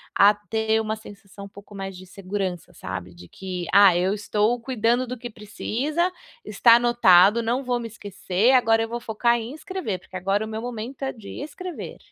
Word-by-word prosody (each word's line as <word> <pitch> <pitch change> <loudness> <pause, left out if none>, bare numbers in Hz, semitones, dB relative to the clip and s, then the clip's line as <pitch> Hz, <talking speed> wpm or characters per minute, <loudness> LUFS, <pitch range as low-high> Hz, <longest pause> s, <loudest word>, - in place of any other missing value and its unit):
a 200 +1 +7
ter 220 +1 -1
uma 220 0 -2
sensação 200 -2 -12
um - - -11
pouco 200 +1 -15
mais 195 -1 -6
de 185 - -11
segurança 185 -2 -5
sabe. 95 - -7
De 90 0 -13
que, 185 -2 -6
"ah, 200 -3 +7
eu 185 +2 +1
estou 210 +3 0
cuidando 240 0 0
do 250 +1 -5
que 240 +1 -7
precisa, 260 - -2 0.3
está 230 +3 +5
anotado, 235 -3 +5
não 240 +4 -1
vou 245 -1 -1
me 235 - -5
esquecer, 205 0 0
agora 225 -3 +4
eu 225 - -5
vou 240 +1 -4
focar 235 +1 +1
em 230 +3 -7
escrever 365 - -4
porque 185 - -16
agora 195 +3 0
o - - -8
meu 220 0 -5
momento 245 +2 -6
é 265 - -1
de 215 -4 -12
escrever". 335 +4 -7
220 Hz, 195 wpm, -24 LUFS, 195-240 Hz, 0.3 s, a